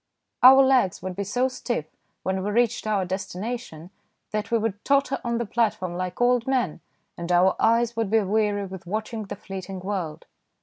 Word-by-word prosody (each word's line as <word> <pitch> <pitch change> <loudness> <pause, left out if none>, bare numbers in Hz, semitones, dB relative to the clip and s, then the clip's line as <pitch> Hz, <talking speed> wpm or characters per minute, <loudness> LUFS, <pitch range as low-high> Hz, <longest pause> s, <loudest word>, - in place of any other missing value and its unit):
Our 265 +2 +9
legs 260 -8 +2
would 185 -1 -4
be 200 - -2
so 245 +6 0
stiff 240 - -3 0.4
when 190 0 -1
we 205 - -1
reached 230 0 +1
our 200 -3 +1
destination 190 -1 -5 0.4
that 215 0 -2
we 235 - +3
would 215 -2 -3
totter 275 -1 +1
on 235 -1 -1
the 235 - -1
plat 225 0 +1
form 185 -2 -5
like 180 0 -4
old 245 0 +3
men, 245 - 0 0.4
and 170 +1 -4
our 180 +2 +4
eyes 230 +1 +3
would 225 -3 -1
be 225 +2 +4
weary 205 0 0
with 190 -2 -9
watching 215 +2 -3
the - - -6
fleeting 195 -1 -7
world. 185 -6 -4
210 Hz, 185 wpm, -25 LUFS, 190-235 Hz, 0.4 s, Our